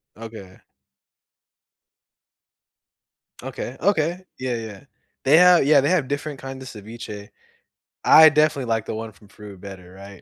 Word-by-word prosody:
Okay. 110 -4 -12 2.8
Okay, 125 - -7
okay. 175 -1 0
Yeah, 130 -1 -3
yeah. 110 -4 -8 0.4
They 145 +4 +5
have 180 -4 +5
yeah, 145 -2 +5
they 145 - 0
have 165 -8 +1
different 145 0 -5
kind 135 0 -9
of 130 - -10
ceviche. 105 -2 -10 0.7
I 155 0 +8
definitely 150 -3 +1
like 110 -1 -1
the - - -5
one 110 0 -7
from 105 0 -22
Peru 105 -2 -13
better, 90 -2 -12
right? 100 0 -13
125 Hz, 135 wpm, -22 LUFS, 105-150 Hz, 2.8 s, I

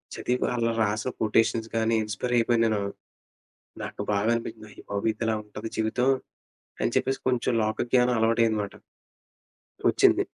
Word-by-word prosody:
చదివి 125 +1 -1
అలా 115 -1 +1
రాసిన 110 +3 0
కొటేషన్స్ 115 +1 +2
గాని 115 0 +2
ఇన్స్పైర్ 110 +3 -3
అయిపోయాను 115 0 +3
నేను. 110 -2 +1 1.0
నాకు - - -5
బాగా 100 +2 +1
అనిపించింది. 115 -2 -6
అయ్యిబాబోయి! 100 +2 -2
ఇదిలా 115 -1 0
ఉంటది 105 +1 -7
జీవితం 110 +3 0 0.7
అని - - +1
చెప్పేసి 135 0 +1
కొంచెం 125 0 +1
లోక 110 0 -1
జ్ఞానం 125 -1 +4
అలవాటయ్యిందిమాట. 110 -2 +1 1.2
వచ్చింది. - - +4
115 Hz, 125 wpm, -26 LUFS, 110-115 Hz, 1.2 s, జ్ఞానం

